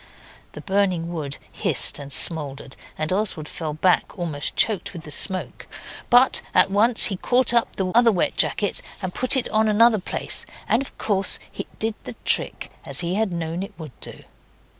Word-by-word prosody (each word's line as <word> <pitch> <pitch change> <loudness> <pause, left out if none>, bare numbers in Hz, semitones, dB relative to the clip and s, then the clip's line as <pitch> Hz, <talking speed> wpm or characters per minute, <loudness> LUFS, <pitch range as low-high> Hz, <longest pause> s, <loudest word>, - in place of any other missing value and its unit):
The - - -9
burning 185 -4 -1
wood 145 -4 -5
hissed - - +2
and 140 -1 -9
smouldered, 140 -3 +2 0.2
and 155 +3 -2
Oswald 190 -6 -2
fell 155 -2 -6
back, 180 +5 +1
almost 160 -5 -3
choked 215 -3 +1
with 170 -3 -9
the 150 - -7
smoke. 185 +5 +1 0.4
But 245 +2 +4
at - - +4
once 220 +4 +4
he 195 - -1
caught 245 +4 +2
up 235 -1 +1
the 190 - -2
other 235 0 +5
wet 180 - -1
jacket 205 - +1 0.2
and 185 -1 -4
put 255 +1 +2
it 260 - -1
on 220 0 +1
another 220 +1 +4
place, 185 - -4 0.2
and 230 - +2
of 275 - -9
course 195 -2 +2 0.2
it - - -7
did 225 0 -2
the - - -8
trick - - -1
as - - -2
he 175 +1 -3
had 215 0 -1
known 170 0 -4
it 200 +1 -8
would 155 -4 -9
do. - - -9
190 Hz, 180 wpm, -22 LUFS, 165-220 Hz, 0.4 s, other